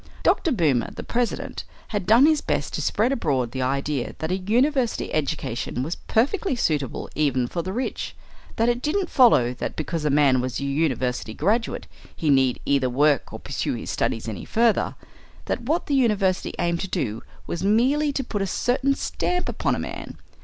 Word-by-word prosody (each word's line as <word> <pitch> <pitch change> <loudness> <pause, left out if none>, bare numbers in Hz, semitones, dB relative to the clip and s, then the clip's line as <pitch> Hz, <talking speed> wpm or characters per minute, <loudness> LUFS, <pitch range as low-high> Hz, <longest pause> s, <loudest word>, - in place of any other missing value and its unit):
Dr. 330 - +3
Boomer, 155 - +2
the - - -8
president, 240 0 -2 0.3
had 205 -4 -3
done 235 +6 +7
his 310 -1 +4
best 145 -1 -2
to - - -2
spread 215 - +1
abroad 135 - 0
the 130 - -3
idea 135 0 -1
that 160 +2 -3
a 185 - +1
university 245 +6 +1
education 130 -4 -2
was 160 +5 -2
perfectly 280 - 0
suitable 150 - -1
even 140 -5 +1
for 170 - -3
the 185 +3 -4
rich; 245 +6 -3 0.4
that 230 - +2
it 240 0 +1
didn't 355 +6 -1
follow 225 - +5
that - - -5
because 160 +1 -3
a 150 - +1
man 140 -3 +4
was 130 -1 -3
a - - -4
university 130 -6 -1
graduate 220 +8 0 0.3
he 155 -3 +1
need 130 -2 +3
either 135 -2 +2
work 145 +2 +2
or - - -6
pursue - - -3
his - - -5
studies 115 - -1
any 110 -4 -5
further; 230 -1 +2 0.5
that - - -2
what 305 +9 0
the 290 - -2
university 210 -8 +1
aimed 170 -1 0
to 195 - -3
do 115 - -2 0.2
was 170 - -4
merely 260 +9 +3
to 275 -1 -2
put 205 -4 -3
a 195 - 0
certain 260 +8 +1
stamp 360 +5 -2
upon - - 0
a - - -4
man. - - -6
175 Hz, 185 wpm, -24 LUFS, -, 0.5 s, done